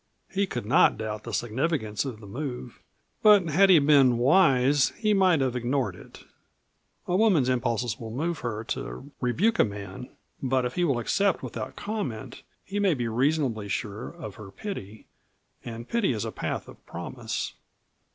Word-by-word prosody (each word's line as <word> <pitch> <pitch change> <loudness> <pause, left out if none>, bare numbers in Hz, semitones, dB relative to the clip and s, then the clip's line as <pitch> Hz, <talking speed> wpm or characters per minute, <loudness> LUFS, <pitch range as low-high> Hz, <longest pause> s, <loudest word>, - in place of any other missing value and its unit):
He 195 0 0
could 120 - -4
not 110 - +4
doubt 110 -1 -5
the - - -5
significance 120 -3 -1
of 125 -6 -5
this 105 - -11
move, 125 +1 -6 0.4
but 205 -5 +6
had 190 +6 +5
he 180 - +8
been 140 -4 +5
wise 135 -1 +4
he 215 -2 +2
might 185 -6 +4
have 130 -2 0
ignored 125 -4 -1
it. - - -14 0.8
A 180 - 0
woman's 185 - +4
impulses 120 -2 0
will 115 - -6
move 155 +8 -2
her 110 -2 -4
to 135 +1 -5
rebuke 185 - +1
a - - +8
man, 100 +2 -6 0.3
but 130 -1 +1
if 125 - -3
he 180 - 0
will 140 -7 +1
accept 195 - +1
without - - -6
comment 200 - -5 0.2
he 200 +2 -3
may 195 -5 +3
be 120 -3 -2
reasonably 125 -3 0
sure 105 +2 -3
of 155 - -9
her 105 -3 -9
pity, 105 - -7 0.6
and 115 0 -7
pity 230 - +1
is 105 - -3
a - - -4
path - - -4
of - - -14
promise. - - -5
130 Hz, 170 wpm, -27 LUFS, 115-170 Hz, 0.8 s, he